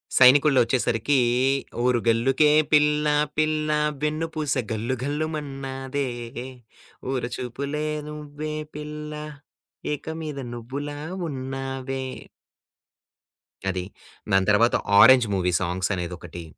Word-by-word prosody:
'సైనికుడి' 140 +3 +7
లో - - +6
ఒచ్చేసరికీ 120 +2 +1 0.6
ఓరుగల్లుకే 125 +3 +3 0.2
పిల్ల, 150 0 +4 0.3
పిల్ల 155 0 +1 0.3
వెన్నుపూస 155 -1 -1 0.2
గల్లు 115 +4 -1
గల్లుమన్నదే. 140 -2 -3 1.0
ఓర 130 -2 -1
చూపులే 140 +5 -4 0.2
నువ్వే, 150 0 -6 0.2
పిల్లా, 150 0 -6 0.7
ఏక 150 - -7 0.2
మీద 150 -3 -5
నువ్వులా 140 +5 -6 0.3
ఉన్నావే. 135 0 -4 1.7
అది. 95 -1 -2 0.5
దాని 95 0 +3
తర్వాత 115 +3 +4 0.2
'ఆరెంజ్' 125 0 +8
మూవీ 90 -1 0
సాంగ్స్ 90 +2 -1
అనేదొకటి. 90 -1 -6
135 Hz, 85 wpm, -24 LUFS, 120-150 Hz, 1.7 s, ఆరెంజ్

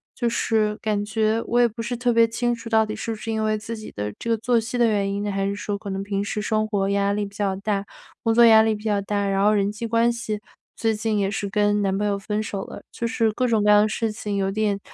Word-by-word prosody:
就 240 - 0
是 215 -2 0
感 210 -2 -1
觉 220 +2 +1
我 240 - +2
也 240 - +5
不 230 +1 -7
是 240 +1 -3
特 245 0 +1
别 230 0 +6
清 240 +1 -1
楚 230 0 -9
到 220 -1 +4
底 215 - -5
是 230 - -4
不 220 - -4
是 225 - -7
因 220 0 -1
为 215 0 +1
自 225 +2 -6
己 215 - -9
的 105 0 -4
这 230 - -5
个 230 - +2
作 235 +2 +1
息 235 +2 -4
的 240 -1 +4
原 200 -2 0
因 200 +1 -2
呢， 205 - -2
还 195 0 -1
是 200 - -1
说 205 0 -3
可 200 - -8
能 195 0 -3
平 200 0 -2
时 210 +1 -3
生 215 0 0
活 200 -2 0
压 200 0 +1
力 205 0 -1
比 200 0 -12
较 200 -2 0
大、 200 0 -2 0.4
工 225 - +2
作 235 +1 +7
压 220 -1 +8
力 220 0 +2
比 210 - -10
较 205 -2 +1
大。 200 0 -1
然 195 0 +1
后 210 - +5
人 200 -1 +2
际 215 +2 -6
关 230 +1 +3
系， 220 -3 -4 0.4
最 225 -1 +1
近 215 0 -1
也 195 -1 +1
是 200 0 -3
跟 205 +1 +2
男 195 -1 0
朋 210 +1 0
友 200 -1 0
分 210 +1 -2
手 200 -2 -4
了， - - -9
就 235 - -4
是 225 -1 +1
各 255 +3 0
种 225 -3 +2
各 210 - +3
样 210 0 +7
的 215 - 0
事 225 0 -1
情， 210 -1 -4
有 195 -1 0
点 205 -1 0
215 Hz, 315 characters per minute, -23 LUFS, 200-225 Hz, 0.4 s, 压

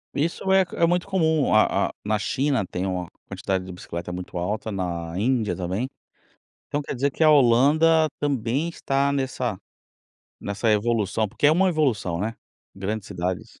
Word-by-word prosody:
Isso 170 +6 -1
é 190 0 +6
é 170 - +3
muito 175 +2 +1
comum. 160 - +2
A 110 - +3
a - - -12
na 105 0 +1
China 135 0 0
tem 90 +2 -3
uma 90 -2 -2 0.2
quantidade 95 -1 -2
de 95 - -8
bicicleta 90 -2 -6
muito 90 0 -6
alta, 105 +5 -2
na 85 -3 -3
Índia 115 0 +1
também. 95 +8 -3 0.8
Então 145 - -2
quer 140 - -5
dizer 140 +3 0
que - - -8
a 155 - +7
Holanda 150 +5 +5
também 140 +3 0
está 140 -3 0
nessa 130 -6 -2 0.8
nessa 100 +3 -2
evolução, 110 -1 +1
porque 145 - +1
é - - +5
uma 190 +3 +3
evolução, 125 - 0
né. 110 +2 -2 0.4
Grandes 100 +2 -4
cidades 90 -1 -4
115 Hz, 165 wpm, -24 LUFS, 95-145 Hz, 0.8 s, a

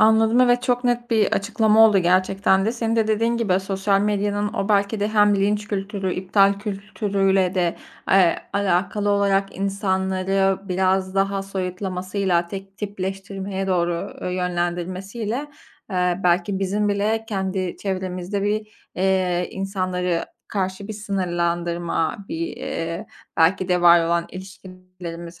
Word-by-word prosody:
Anladım, 220 +2 +5
evet, 245 0 +4
çok 245 -1 0
net 240 0 0
bir 220 -3 +2
açıklama 220 +1 +4
oldu 205 -3 +4
gerçekten 190 +2 +2
de. 225 - +1
Senin 230 -1 -1
de, 220 -1 +2
dediğin 230 +2 +1
gibi, 195 -5 +1
sosyal 195 +1 0
medyanın 205 0 0
o 200 -3 -2
belki 205 +1 +1
de 205 - +1
hem 210 -1 +4
linç 205 +1 0
kültürü, 195 -2 -2
iptal 195 +1 +3
kültürüyle 195 -2 0
de, 175 -3 0 0.3
eee, 185 -3 +5 0.2
alakalı 200 +1 +1
olarak 200 -1 +1
insanları 195 -1 0
biraz 190 +1 +1
daha 195 0 +1
soyutlamasıyla 185 -1 -2
tek 195 +1 -8
tipleştirmeye 195 -1 -4
doğru, 175 -2 +1 0.3
ııı, - - -2
yönlendirmesiyle, 180 +5 -2 0.6
ııı, 180 0 +1
belki 180 +2 +2
bizim 200 +2 0
bile 215 +2 0
kendi 190 -3 -2
çevremizde 185 0 -3
bir, 210 +1 -1 0.3
iii, 185 -2 +1
insanları 185 -3 -2 0.2
karşı 190 0 -3
bir - - -3
sınırlandırma, 175 -4 -1
bir, 165 +1 -4
ııı, 165 0 -4 0.3
belki 180 +3 +3
de 180 -1 +2
var 170 -1 +6
olan 170 0 +1
ilişkilerimiz 185 -2 -10
195 Hz, 130 wpm, -22 LUFS, 185-205 Hz, 0.6 s, var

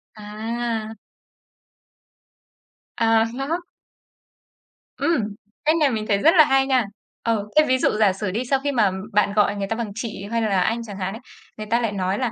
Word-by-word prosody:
À! 220 +1 -4 2.0
À! 225 -1 +3
Khác. 275 +7 -2 1.4
Ừm, 325 -10 +1 0.4
cách 310 +2 +4
này 300 -3 +4
mình 215 -2 -2
thấy 200 -2 +2
rất 320 - +4
là 310 -3 +8
hay 270 0 +2
nha. 255 -3 +3 0.4
Ờ, 220 -3 0
thế 305 - +7
ví 260 - +3
dụ - - +2
giả 205 -3 +4
sử 195 0 -3
đi 235 +6 -2
sau 270 -1 +3
khi 285 - 0
mà 215 -7 +2 0.2
bạn 205 0 +2
gọi 205 -1 +2
người 200 -1 -3
ta 225 - -2
bằng 225 -3 -4
chị 220 -3 -5
hay 230 - 0
là 200 -4 +1
anh 230 +5 0
chẳng 205 -3 -8
hạn 190 0 -3
ấy, 225 - -8 0.4
người 215 0 -6
ta 235 - +3
lại 225 - 0
nói 190 -1 -1
là, 245 -3 -1
225 Hz, 190 wpm, -22 LUFS, 205-255 Hz, 2.0 s, là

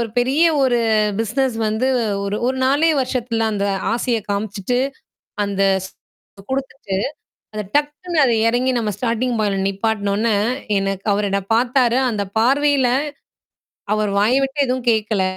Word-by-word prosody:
ஒரு 235 - -1
பெரிய 265 +6 +2 0.2
ஒரு 255 -2 +3 0.4
பிசினஸ் 250 +3 0
வந்து 220 +4 0 0.4
ஒரு 200 +1 -2
ஒரு 260 +1 0
4 290 +5 +3
வருஷத்துல 245 -3 -1
அந்த 200 -1 -1 0.3
ஆசைய 235 0 0
காமிச்சுட்டு 205 +3 -2 0.7
அந்த 200 -1 -1 0.2
ஸ் - - -14 0.6
குடுத்துட்டு 265 -7 -3 0.6
அத 215 - -2
டக்குன்னு 295 +4 -1
அது 240 -3 +3
எறங்கி 250 +2 +1
நம்ம 220 -2 -1
ஸ்டார்ட்டிங் 240 +2 -1
பாயின்ட்ல 200 -2 0
நிப்பாட்னோனே 205 +1 0 0.4
எனக்கு 195 0 -3
அவரு 205 0 0
என்ன 200 0 +1
பார்த்தாரு. 245 +1 +2
அந்த 210 -3 -2
பார்வையில 275 +2 +3 1.1
அவர் 215 -1 0
வாய் 225 +6 +3
விட்டு 270 +2 -1
எதுவும் 255 -1 -3
கேட்கல. 215 -3 0
230 Hz, 135 wpm, -20 LUFS, 210-260 Hz, 1.1 s, ஒரு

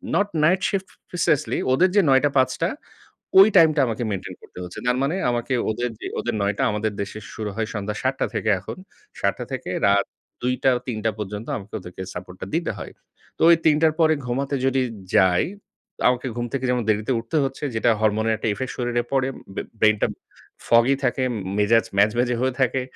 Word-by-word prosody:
not 205 - +2 0.2
night 185 +4 +4
shift 195 -2 -2 0.2
preciously 160 -4 0 0.2
ওদের 180 +7 +4
যে 205 - +6
৯ঃ০০ 130 0 +5
টা 145 - +4
৫ঃ০০ 130 - +4
টা - - +2 0.7
ওই 195 - +10
টাইমটা 155 -3 +6
আমাকে 115 +1 -2
maintain 95 -2 -5
করতে - - -12
হচ্ছে। 90 - -8
তার 125 - +2
মানে 155 +6 0 0.2
আমাকে 120 +2 -2 0.2
ওদের 120 +3 -2
যে - - -5
ওদের 120 -2 -2
৯ঃ০০ 100 +1 +1
টা - - +2
আমাদের 105 +1 -1
দেশে 100 +2 -5 0.2
শুরু 110 -2 -4
হয় 110 0 -1
সন্ধ্যা 105 0 -3
৭ঃ০০ 130 +1 +2
টা - - +2
থেকে 110 - 0
এখন। 95 - -8 0.4
৭ঃ০০ - - +2
টা - - -3
থেকে - - -5 0.2
রাত 100 0 +3 0.4
২ঃ০০ 125 +1 +1
টা, 135 - +5 0.2
৩ঃ০০ 120 - -3
টা 110 - +3
পর্যন্ত 105 +2 -5
আমাকে 105 +1 -12
ওদেরকে 90 +1 -8
সাপোর্টটা 90 +1 -7
দিতে 170 +1 0
হয়। - - -7 0.5
তো - - -10
ওই 170 - +8
৩ঃ০০ 155 - +6
টার 160 -1 +4
পরে 160 -1 +5
ঘুমাতে 135 +3 -1
যদি 135 0 +2 0.3
যাই, 90 -1 +5 0.5
তা - - -6
আমাকে 125 +1 -3
ঘুম 120 0 -2
থেকে 130 -1 -1
যেমন 125 -1 +1
দেরিতে 110 +4 +1
উঠতে 115 +8 -3
হচ্ছে 135 +2 -6
যেটা 110 - +2
হরমোনের 110 +1 +2
একটা - - -3
ইফেক্ট 130 +5 -3
শরীরে 120 -1 0
পড়ে। 135 -1 +2 0.3
বে - - -2 0.2
ব্রেইন 110 -1 +5
টা - - +4 0.6
foggy 120 +4 +5
থাকে 130 +1 0
উম - - -3 0.2
মেজাজ 115 +2 +4
ম্যাজম্যাজ 115 +5 +3
হয়ে 130 0 +1
থাকে। 130 0 +2
120 Hz, 205 wpm, -23 LUFS, 105-135 Hz, 0.7 s, ওই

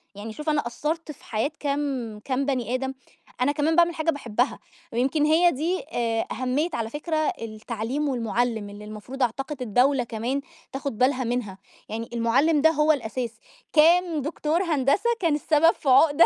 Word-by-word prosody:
يعني 215 +2 -7
شوف 300 +6 -4
أنا 290 -5 +1
أثّرت 310 +6 -3
في 285 - -16
حياة 225 +7 -1
كام 275 -6 -2
كام 270 +1 0
بني 250 -4 -1
آدم. 265 +1 -2 0.5
أنا 265 +3 +3
كمان 295 +2 +1
باعمل 345 0 +4
حاجة 315 +1 -1
باحبها 245 -3 -1 0.3
ويمكن 270 +6 +2
هي 330 +3 +5
دي 335 +7 -1
آآ 230 -1 0
أهمية 260 +7 0
على 225 -1 -2
فكرة 305 +5 -3 0.3
التعليم 230 +5 -3
والمُعلِّم 235 -3 -1
اللي 205 +1 -10
المفروض 215 +6 -5
أعتقد 270 +4 -2
الدولة 250 +3 +3
كمان 235 +4 -2 0.3
تاخد 270 -4 -4
بالها 255 +1 +2
منها. 235 -5 -2 0.3
يعني 225 +1 -4
المُعلِّم 265 +7 +3
ده 320 - +6
هو 305 0 +3
الأساس، 245 -4 -2 0.4
كان 330 0 +4
دكتور 310 +4 -1
هندسة 310 - +2
كان 330 -5 +2
السبب 310 +2 +4
في 280 - -3
عُقدة 290 +4 +6
270 Hz, 160 wpm, -25 LUFS, 235-300 Hz, 0.5 s, ده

